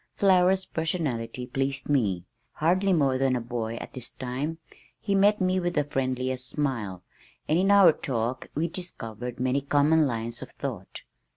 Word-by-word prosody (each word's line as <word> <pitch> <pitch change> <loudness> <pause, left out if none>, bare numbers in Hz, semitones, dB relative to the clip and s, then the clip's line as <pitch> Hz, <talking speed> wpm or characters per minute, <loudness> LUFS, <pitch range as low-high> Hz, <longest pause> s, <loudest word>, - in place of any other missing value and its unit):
Flower's 190 -1 +4
personality 145 -8 -2
pleased 135 +2 -2
me. 100 -11 +1 0.3
Hardly 185 +5 +2
more 140 -7 +2
than 135 -1 +2
a - - 0
boy 115 -1 -4
at - - -8
this 125 -2 -5
time, 130 +6 -4 0.4
he 200 - -1
met 205 +2 +4
me 185 0 +2
with 175 -1 -2
the 150 - +3
friendliest 130 -2 -2
smile, 115 - -2 0.4
and 160 +3 +3
in 195 +2 +2
our 200 -5 +7
talk 125 -2 -3
we 160 +3 +1
discovered 125 - -6
many 130 +2 +1
common 145 +2 +3
lines 115 -1 -4
of - - -8
thought. 115 -9 -6
135 Hz, 160 wpm, -27 LUFS, 125-170 Hz, 0.4 s, our